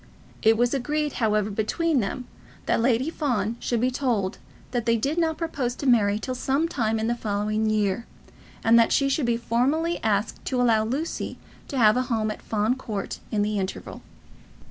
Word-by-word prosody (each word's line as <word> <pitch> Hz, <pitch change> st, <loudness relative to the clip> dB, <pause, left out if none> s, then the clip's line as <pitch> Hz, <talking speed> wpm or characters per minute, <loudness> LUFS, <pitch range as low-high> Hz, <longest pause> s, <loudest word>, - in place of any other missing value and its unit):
It 220 Hz, 0 st, +5 dB
was 245 Hz, +2 st, +2 dB
agreed, 295 Hz, +3 st, -1 dB
however, 215 Hz, -1 st, +2 dB
between 275 Hz, +9 st, 0 dB
them, 245 Hz, +4 st, -3 dB, 0.4 s
that -, -, +1 dB
Lady 255 Hz, +5 st, +2 dB
Fawn 235 Hz, -9 st, -1 dB
should 240 Hz, -, -1 dB
be 250 Hz, +2 st, +1 dB
told 230 Hz, -7 st, -1 dB, 0.3 s
that 240 Hz, -2 st, -2 dB
they 230 Hz, 0 st, +4 dB
did 285 Hz, +9 st, -1 dB
not 320 Hz, -2 st, +1 dB
propose 275 Hz, -7 st, -2 dB
to -, -, -6 dB
marry 210 Hz, -5 st, +4 dB
till 255 Hz, +4 st, -4 dB
some 275 Hz, +5 st, 0 dB
time 225 Hz, -9 st, 0 dB
in 220 Hz, -, -1 dB
the 235 Hz, -, +1 dB
following 215 Hz, -1 st, -1 dB
year, 215 Hz, +1 st, 0 dB, 0.6 s
and 230 Hz, +1 st, +6 dB
that 230 Hz, -, +4 dB
she 275 Hz, -, +3 dB
should 275 Hz, -2 st, 0 dB
be 235 Hz, -1 st, +2 dB
formally 275 Hz, +9 st, 0 dB
asked 210 Hz, 0 st, 0 dB
to 255 Hz, -, -1 dB
allow 230 Hz, -3 st, +4 dB
Lucy 275 Hz, +9 st, -3 dB, 0.3 s
to 275 Hz, -, -4 dB
have 215 Hz, -1 st, +5 dB
a -, -, +3 dB
home 220 Hz, -2 st, 0 dB
at -, -, -8 dB
Fawn 215 Hz, +3 st, 0 dB
Court 215 Hz, -6 st, -5 dB
in 210 Hz, -2 st, +1 dB
the 210 Hz, 0 st, -1 dB
interval. 190 Hz, 0 st, -5 dB
235 Hz, 190 wpm, -25 LUFS, 215-265 Hz, 0.6 s, and